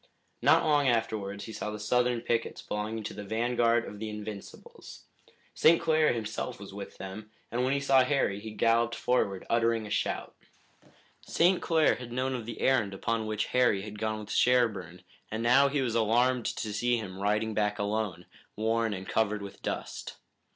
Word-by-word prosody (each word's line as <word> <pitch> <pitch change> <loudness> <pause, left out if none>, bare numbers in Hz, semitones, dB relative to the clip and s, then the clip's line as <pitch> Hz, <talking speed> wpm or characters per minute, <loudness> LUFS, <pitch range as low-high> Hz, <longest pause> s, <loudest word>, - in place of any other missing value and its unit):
Not - - +5
long 145 -3 +3
afterwards 105 -4 -1
he 110 - -8
saw 105 - -4
the 105 0 -6
Southern 125 +2 +1
pickets 115 -1 -1
belonging 105 +1 -4
to - - -5
the 105 - -7
vanguard 115 +2 +1
of 105 - -9
the 110 0 -4
Invincibles. 105 -1 -9 0.5
St. 165 +1 +5
Clair 155 -1 +3
himself 115 +2 -4
was 100 -1 -10
with 100 0 -8
them, 95 +3 -8 0.2
and 120 +2 0
when 130 - +1
he 140 - +1
saw 135 -2 +4
Harry 125 -7 0
he 110 +2 -7
galloped 115 +2 +2
forward, 100 -6 0
uttering 115 -1 +1
a 105 - -8
shout. - - -2 0.9
St. 175 +2 +2
Clair 160 -2 +3
had 120 -1 -9
known 130 +2 -1
of 120 -3 -5
the 120 - -6
errand 110 -7 +2
upon 110 +2 -1
which 105 -1 -1
Harry 120 -6 +3
had 105 0 -8
gone 110 0 -1
with 105 0 -9
Sherburne, 105 -9 +1 0.3
and 110 +2 -3
now 135 +4 +5
he 140 0 0
was 120 -3 -1
alarmed 120 +2 +2
to 105 -2 -3
see 120 +3 +1
him 95 -4 -6
riding 105 +2 0
back 105 -1 0
alone, 100 -4 -2 0.3
worn 110 0 0
and 95 0 -8
covered 105 -2 0
with 100 - -10
dust. - - -5
110 Hz, 180 wpm, -29 LUFS, 105-125 Hz, 0.9 s, Not